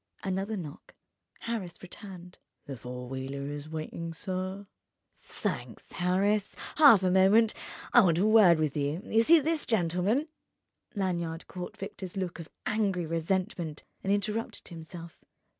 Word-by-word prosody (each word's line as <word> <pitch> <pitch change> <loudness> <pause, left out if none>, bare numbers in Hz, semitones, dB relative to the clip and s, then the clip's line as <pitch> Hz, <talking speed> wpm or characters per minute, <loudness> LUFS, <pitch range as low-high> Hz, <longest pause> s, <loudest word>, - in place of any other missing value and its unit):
Another 195 +3 -2
knock: 155 -5 -9 0.5
Harris 220 -7 -4
returned. 180 -1 -11 0.3
"The 140 - -6
four 125 +1 -7
wheeler 135 +2 -5
is 145 0 -6
w'iting, 160 +1 -5
sir." 185 +2 -4 0.5
"Thanks, - - -5
Harris. 195 +3 +1 0.2
Half 275 -11 +8
a 185 - +3
moment: 200 +4 +5 0.4
I 240 - +9
want 170 -6 +3
a 190 - +3
word 215 -6 +7
with 155 -3 0
you. 145 +4 -1
You 225 - +3
see 325 +8 +7
this 315 +1 -1
gentleman?" 200 - +1 0.7
Lanyard 170 -4 -2
caught 180 -1 -7
Victor's 190 -1 -7
look 180 -2 -3
of 165 - -8 0.2
angry 200 -5 0
resentment 165 0 -2 0.2
and 195 - 0
interrupted 210 +2 -2
himself. 165 0 -10
185 Hz, 135 wpm, -29 LUFS, 165-205 Hz, 0.7 s, I